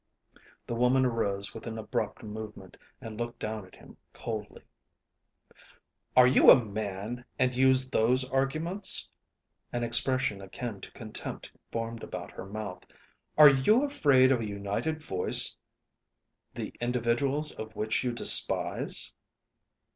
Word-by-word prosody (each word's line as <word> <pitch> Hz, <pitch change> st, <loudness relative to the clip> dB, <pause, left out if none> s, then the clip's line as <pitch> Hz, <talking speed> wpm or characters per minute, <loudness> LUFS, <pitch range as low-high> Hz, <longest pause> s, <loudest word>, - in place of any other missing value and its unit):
The -, -, -5 dB
woman 125 Hz, +2 st, +3 dB
arose 100 Hz, -4 st, -1 dB
with 115 Hz, -, -9 dB
an 115 Hz, -1 st, -5 dB
abrupt 110 Hz, +1 st, -4 dB
movement, 110 Hz, 0 st, -9 dB, 0.3 s
and 110 Hz, -1 st, -8 dB
looked 120 Hz, 0 st, -4 dB
down 110 Hz, -3 st, -5 dB
at -, -, -18 dB
him -, -, -16 dB, 0.2 s
coldly. 110 Hz, -2 st, -7 dB, 1.5 s
"Are 125 Hz, -, +9 dB
you 125 Hz, 0 st, +6 dB
a 125 Hz, -, +7 dB
man, 105 Hz, +3 st, -5 dB
and 125 Hz, -1 st, +1 dB
use 130 Hz, 0 st, +4 dB
those 130 Hz, +1 st, +1 dB
arguments?" 155 Hz, +9 st, +1 dB, 0.6 s
An 120 Hz, 0 st, -2 dB
expression 120 Hz, -2 st, +2 dB
akin 100 Hz, +1 st, -7 dB
to -, -, -10 dB
contempt 110 Hz, -2 st, -7 dB, 0.2 s
formed 115 Hz, 0 st, -4 dB
about -, -, -7 dB
her 95 Hz, -, -9 dB
mouth. 100 Hz, -3 st, -6 dB, 0.6 s
"Are 150 Hz, -1 st, +10 dB
you 140 Hz, -, +3 dB
afraid 140 Hz, -, +3 dB
of 130 Hz, -, +2 dB
a 110 Hz, -, -4 dB
united 100 Hz, +11 st, -3 dB
voice 95 Hz, -10 st, +1 dB, 1.0 s
the -, -, -6 dB
individuals 125 Hz, +5 st, 0 dB
of 110 Hz, 0 st, -9 dB
which 110 Hz, +4 st, -1 dB
you 125 Hz, -, -1 dB
despise?" 120 Hz, -, +2 dB
120 Hz, 130 wpm, -29 LUFS, 110-130 Hz, 1.5 s, Are